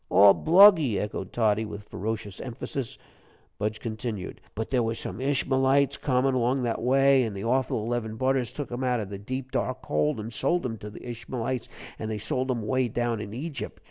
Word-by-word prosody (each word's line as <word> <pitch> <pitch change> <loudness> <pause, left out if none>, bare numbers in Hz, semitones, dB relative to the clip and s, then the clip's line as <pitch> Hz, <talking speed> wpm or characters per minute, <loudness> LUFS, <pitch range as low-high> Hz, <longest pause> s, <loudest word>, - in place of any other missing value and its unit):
"All 100 +2 +8
bluggy," 165 - +6
echoed 95 -2 -4
Toddy, 110 -2 +2
with 105 -1 -8
ferocious 105 -1 -4
emphasis. 125 0 -5 0.6
Budge 105 +1 -2
continued: 110 -3 -5
"But 110 +2 -4
there 125 -2 +3
were 115 0 -1
some 95 -2 -6
Ishmalites 135 0 +2
comin' 130 0 +2
along 125 +1 +1
that 115 -2 -1
way, 135 +2 +4
and 110 -5 -2
the 95 - -5
awful 120 -2 +1
eleven 115 -2 -2
budders 130 -1 +1
took 145 -4 -6
him 120 +2 -3
out 125 -2 +1
of 100 -2 -5
the 100 - -5
deep, 130 +5 -5
dark - - -2
hole, 75 +6 +1
an' 110 +2 -5
sold 170 +9 0
him 115 -3 -3
to 105 - -7
the 105 - -11
Ishmalites, 120 +1 -4 0.3
and 110 - -4
they 110 - -2
sold 130 +5 -2
him 120 -3 -1
away 130 +3 +1
down 120 -1 -1
in 100 -1 -6
Egypt. 140 +4 -6
120 Hz, 195 wpm, -27 LUFS, 110-130 Hz, 0.6 s, All